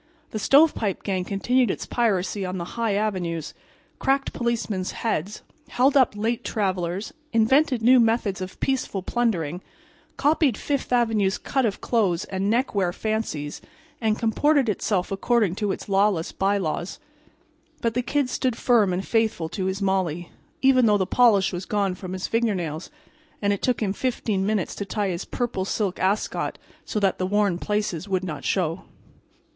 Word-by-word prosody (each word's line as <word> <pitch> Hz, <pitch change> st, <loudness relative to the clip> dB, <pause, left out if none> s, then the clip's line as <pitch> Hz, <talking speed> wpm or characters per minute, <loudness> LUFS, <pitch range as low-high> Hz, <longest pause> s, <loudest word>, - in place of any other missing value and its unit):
The 215 Hz, -, -3 dB
Stovepipe 275 Hz, -, +3 dB
gang 190 Hz, -2 st, -1 dB
continued 240 Hz, +6 st, +1 dB
its -, -, -3 dB
piracy 205 Hz, -4 st, 0 dB
on 185 Hz, 0 st, -3 dB
the 170 Hz, 0 st, -6 dB
high 230 Hz, -3 st, 0 dB
avenues, 180 Hz, -7 st, -2 dB, 0.5 s
cracked 275 Hz, 0 st, +1 dB
policemen's 225 Hz, -6 st, -2 dB
heads, 205 Hz, -3 st, -3 dB, 0.3 s
held 260 Hz, +3 st, +2 dB
up 260 Hz, -6 st, +4 dB
late 230 Hz, +3 st, -1 dB
travelers, 190 Hz, -2 st, -2 dB, 0.2 s
invented 250 Hz, +2 st, +3 dB
new 250 Hz, +2 st, +7 dB
methods 225 Hz, -5 st, +1 dB
of 185 Hz, 0 st, -7 dB
peaceful 255 Hz, -8 st, -1 dB
plundering, 180 Hz, -9 st, -1 dB, 0.6 s
copied 290 Hz, -5 st, +2 dB
Fifth 280 Hz, -3 st, -2 dB
avenue's 220 Hz, -5 st, +2 dB
cut 265 Hz, -4 st, 0 dB
of 200 Hz, -, -4 dB
clothes 195 Hz, -8 st, +1 dB
and 195 Hz, +1 st, -2 dB
neckwear 210 Hz, -6 st, +1 dB
fancies 195 Hz, -9 st, -3 dB, 0.4 s
and 220 Hz, -1 st, +1 dB
comported 270 Hz, +4 st, +2 dB
itself 200 Hz, -2 st, -1 dB
according 205 Hz, -1 st, +1 dB
to 205 Hz, +1 st, -1 dB
its -, -, -5 dB
lawless 195 Hz, -4 st, +2 dB
bylaws. 195 Hz, -3 st, -1 dB, 0.8 s
But 230 Hz, -1 st, 0 dB
the 245 Hz, -, +1 dB
Kid 280 Hz, +2 st, 0 dB
stood 250 Hz, -1 st, -1 dB
firm 225 Hz, -7 st, +3 dB
and 185 Hz, +2 st, -3 dB
faithful 220 Hz, -8 st, +1 dB
to 185 Hz, +2 st, -3 dB
his 190 Hz, +1 st, -2 dB
Molly, 180 Hz, -3 st, -1 dB, 0.3 s
even 255 Hz, -3 st, +5 dB
though 210 Hz, -1 st, +4 dB
the 190 Hz, -, 0 dB
polish 205 Hz, -3 st, +4 dB
was 180 Hz, +1 st, -4 dB
gone 200 Hz, -3 st, 0 dB
from 185 Hz, 0 st, -7 dB
his 185 Hz, 0 st, -3 dB
fingernails 185 Hz, -9 st, -1 dB, 0.5 s
and 205 Hz, -1 st, +1 dB
it 200 Hz, -, -4 dB
took 245 Hz, -3 st, +1 dB
him 195 Hz, -2 st, 0 dB
15 220 Hz, -5 st, -1 dB
minutes 205 Hz, -2 st, 0 dB
to -, -, -2 dB
tie 200 Hz, 0 st, -2 dB
his 175 Hz, -2 st, -3 dB
purple 240 Hz, -6 st, -2 dB
silk 195 Hz, -1 st, -2 dB
ascot 195 Hz, +3 st, -1 dB, 0.3 s
so 210 Hz, -, -2 dB
that 195 Hz, -2 st, +1 dB
the 185 Hz, -, 0 dB
worn 200 Hz, -3 st, +1 dB
places 205 Hz, -4 st, -2 dB
would 185 Hz, -1 st, 0 dB
not 150 Hz, -6 st, -5 dB
show. 175 Hz, -2 st, -1 dB
205 Hz, 160 wpm, -24 LUFS, 185-235 Hz, 0.8 s, new